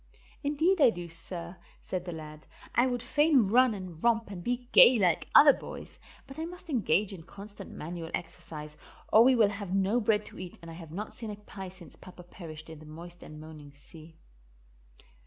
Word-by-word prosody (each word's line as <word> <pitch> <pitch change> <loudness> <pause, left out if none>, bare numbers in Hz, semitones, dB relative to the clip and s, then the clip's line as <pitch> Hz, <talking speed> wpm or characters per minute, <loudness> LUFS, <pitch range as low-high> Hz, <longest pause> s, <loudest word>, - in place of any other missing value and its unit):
"Indeed 315 +5 +1
I 265 - +8
do, 175 -5 -6
sir," 170 +1 0 0.2
said 180 -1 -5
the 175 - -5
lad. 155 -1 -10 0.3
"I 245 +2 +3
would 245 -2 -2
fain 290 -3 +3
run 250 0 +4
and 180 -4 -9
romp 230 -2 +2
and 180 -3 -7
be 245 +2 -2
gay 250 - +8
like 180 -5 +1
other 285 -1 +9
boys, - - -10 0.3
but 270 +3 -11
I 320 - -2
must 355 -1 -10
engage 205 - +1
in 180 - -9
constant 200 +4 -11
manual 165 +1 -7
exercise, 155 -3 -9 0.4
or 220 - +8
we 260 +1 +5
will 220 -4 +4
have 200 -2 -4
no 195 +5 +2
bread 210 -2 +1
to - - -12
eat 180 -1 -8
and 165 0 -11
I - - -9
have 165 -2 -11
not 205 +6 -6
seen 230 -4 -7
a 210 - -5
pie 200 -2 -9
since 180 -4 -15
papa 180 -1 -13
perished 160 -3 -11
in 160 -2 -10
the 155 - -13
moist 170 +3 -11
and 155 0 -11
moaning 155 -2 -12
sea." 160 +3 -16
190 Hz, 200 wpm, -29 LUFS, 165-235 Hz, 0.4 s, other